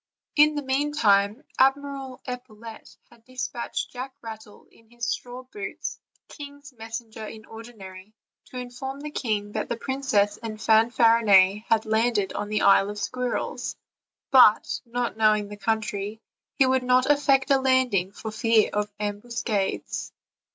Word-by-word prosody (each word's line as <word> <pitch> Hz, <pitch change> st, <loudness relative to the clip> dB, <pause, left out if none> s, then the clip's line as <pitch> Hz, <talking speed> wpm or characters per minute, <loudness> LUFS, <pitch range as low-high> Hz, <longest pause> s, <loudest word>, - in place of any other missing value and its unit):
In 300 Hz, 0 st, +5 dB
the 290 Hz, -, -2 dB
meantime 265 Hz, -5 st, +2 dB, 0.2 s
Admiral 270 Hz, -1 st, 0 dB
Epaulette 235 Hz, -3 st, -9 dB
had 235 Hz, -1 st, -21 dB
dispatched 250 Hz, -1 st, -4 dB
Jack 260 Hz, +1 st, -7 dB
Rattle, 220 Hz, -2 st, -10 dB
in 225 Hz, -1 st, -24 dB
his 240 Hz, 0 st, -6 dB
straw 245 Hz, +2 st, -4 dB
boots, 255 Hz, +6 st, -6 dB, 0.3 s
king's 285 Hz, -1 st, -11 dB
messenger 225 Hz, -1 st, -8 dB
in 220 Hz, 0 st, -10 dB
ordi 230 Hz, +2 st, -11 dB
nary, 190 Hz, +2 st, -12 dB, 0.3 s
to 255 Hz, -, -10 dB
inform 250 Hz, +3 st, -6 dB
the 300 Hz, 0 st, -6 dB
king 210 Hz, -7 st, -2 dB
that -, -, -3 dB
the 235 Hz, -, -2 dB
princess 235 Hz, -6 st, 0 dB
and 220 Hz, -2 st, -7 dB
Fanfarinet 220 Hz, -3 st, +4 dB
had 225 Hz, 0 st, +2 dB
landed 220 Hz, -2 st, +1 dB
on 205 Hz, -, -4 dB
the 210 Hz, 0 st, 0 dB
Isle 195 Hz, 0 st, +5 dB
of 210 Hz, -, -6 dB
Squirrels; 250 Hz, +4 st, -3 dB, 0.6 s
but, 250 Hz, -5 st, +5 dB
not 240 Hz, -1 st, -3 dB
knowing 215 Hz, -2 st, +3 dB
the 205 Hz, -, -7 dB
country, 210 Hz, 0 st, -2 dB, 0.4 s
he 270 Hz, -, +4 dB
would 260 Hz, 0 st, +2 dB
not 250 Hz, 0 st, +3 dB
effect 280 Hz, -1 st, +3 dB
a 270 Hz, -, +5 dB
landing 255 Hz, -8 st, +2 dB
for 220 Hz, +2 st, -7 dB
fear 225 Hz, 0 st, +2 dB
of 210 Hz, 0 st, -1 dB
ambuscades. 210 Hz, -1 st, -3 dB
230 Hz, 145 wpm, -25 LUFS, 210-260 Hz, 0.6 s, In